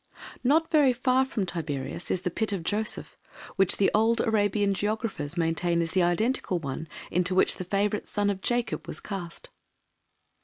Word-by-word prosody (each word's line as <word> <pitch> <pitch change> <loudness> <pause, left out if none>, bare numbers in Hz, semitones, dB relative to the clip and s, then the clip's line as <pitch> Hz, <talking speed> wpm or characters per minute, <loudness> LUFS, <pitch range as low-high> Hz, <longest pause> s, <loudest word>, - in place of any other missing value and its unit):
Not 315 +6 +3
very 290 -5 +5
far 255 +1 +2
from 220 -7 -2
Tiberias 160 -1 -4
is 180 - 0
the 180 - -2
pit 220 +4 0
of 190 -4 -3
Joseph, 215 +5 -2 0.4
which 195 -2 +2 0.2
old 225 +2 +3
Arabian 205 -2 +2
geographers 195 -6 -2
maintain 170 +1 +1
is 165 -1 -1
the 185 - +2
identical 185 +3 +1
one 155 0 -5 0.2
into 180 +1 +1
which - - +3
the 185 - -5
favourite 205 +3 0
son 205 0 +1
of 190 -1 -5
Jacob 240 +2 -1
was - - -4
cast. 180 -5 -7
200 Hz, 160 wpm, -27 LUFS, 175-225 Hz, 0.4 s, very